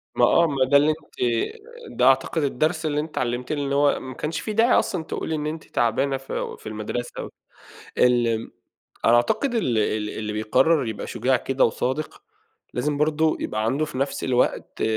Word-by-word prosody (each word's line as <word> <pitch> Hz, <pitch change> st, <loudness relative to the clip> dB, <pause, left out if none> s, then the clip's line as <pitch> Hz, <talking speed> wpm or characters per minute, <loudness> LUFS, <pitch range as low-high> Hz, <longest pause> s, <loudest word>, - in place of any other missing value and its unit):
ما -, -, +5 dB
آه، 170 Hz, -1 st, +4 dB
ما 135 Hz, -3 st, +1 dB
ده 140 Hz, +2 st, +5 dB
اللي 150 Hz, +2 st, +4 dB
أنتِ 155 Hz, -, -10 dB, 0.7 s
ده -, -, 0 dB
أعتقد 160 Hz, -3 st, +3 dB
الدرس 155 Hz, +4 st, 0 dB
اللي 150 Hz, -1 st, 0 dB
أنتِ 155 Hz, +1 st, -3 dB
اتعلمتيه، 125 Hz, +2 st, -2 dB
اللي 140 Hz, -1 st, -1 dB
هو 145 Hz, 0 st, +3 dB
ما 130 Hz, 0 st, -8 dB
كانش 155 Hz, +5 st, -3 dB
في 215 Hz, -, -4 dB
داعي 230 Hz, +3 st, +3 dB
أصلًا 175 Hz, -4 st, -2 dB
تقولي 160 Hz, 0 st, -3 dB
إن 150 Hz, 0 st, -3 dB
أنتِ 155 Hz, 0 st, -5 dB
تعبانة 135 Hz, +4 st, 0 dB
في 135 Hz, -, -5 dB
في -, -, -8 dB
المدرسة 110 Hz, +3 st, -5 dB, 0.7 s
ال 120 Hz, -2 st, +2 dB, 0.5 s
أنا 120 Hz, +1 st, +6 dB
أعتقد 240 Hz, -, +1 dB
ال 125 Hz, -, +1 dB
ال 105 Hz, 0 st, 0 dB
اللي 105 Hz, -1 st, -4 dB
بيقرر 125 Hz, +7 st, +2 dB
يبقى 110 Hz, -, -5 dB
شجاع 130 Hz, +3 st, +1 dB
كده 135 Hz, +2 st, +1 dB
وصادق 130 Hz, -, -2 dB, 0.5 s
لازم 145 Hz, +4 st, -1 dB
برضه 155 Hz, +1 st, +2 dB
يبقى 110 Hz, 0 st, -2 dB
عنده 135 Hz, +7 st, +1 dB
في 140 Hz, -4 st, -7 dB
نفس 135 Hz, +1 st, -2 dB
الوقت 125 Hz, -1 st, 0 dB
135 Hz, 175 wpm, -24 LUFS, 120-155 Hz, 0.7 s, أنا